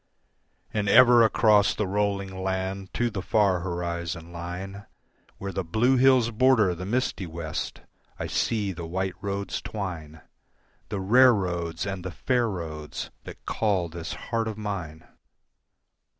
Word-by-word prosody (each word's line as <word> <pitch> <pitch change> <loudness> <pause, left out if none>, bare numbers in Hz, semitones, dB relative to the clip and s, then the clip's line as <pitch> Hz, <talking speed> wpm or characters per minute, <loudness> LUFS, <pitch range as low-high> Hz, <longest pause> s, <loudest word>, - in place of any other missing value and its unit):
And 105 -2 0
ever 120 +2 +8
across 110 -2 +4
the 105 - -1
rolling 100 -1 -1
land 95 0 -3
to 120 -1 +1
the 100 -3 -3
far 100 -2 +2
horizon 85 -1 -4
line, 90 +4 -6 0.5
Where 100 0 -5
the 95 0 -2
blue 110 +10 +2
hills 130 -2 +4
border 115 -5 +4
the 90 +2 -6
misty 110 -5 -1
west, 80 -1 -5 0.4
I - - -4
see 105 -4 0
the 85 -2 -6
white 95 +2 -2
roads 100 0 -3
twine, 80 -7 -6 0.7
The 100 - -3
rare 120 +6 +6
roads 85 -4 -2
and 95 -2 -4
the 95 - -4
fair 120 +7 0
roads 80 -5 -6
that - - -11
call 95 -6 0
this 85 0 -6
heart 115 -1 -2
of 110 -1 -4
mine. 90 -7 -5
95 Hz, 140 wpm, -26 LUFS, 85-110 Hz, 0.7 s, ever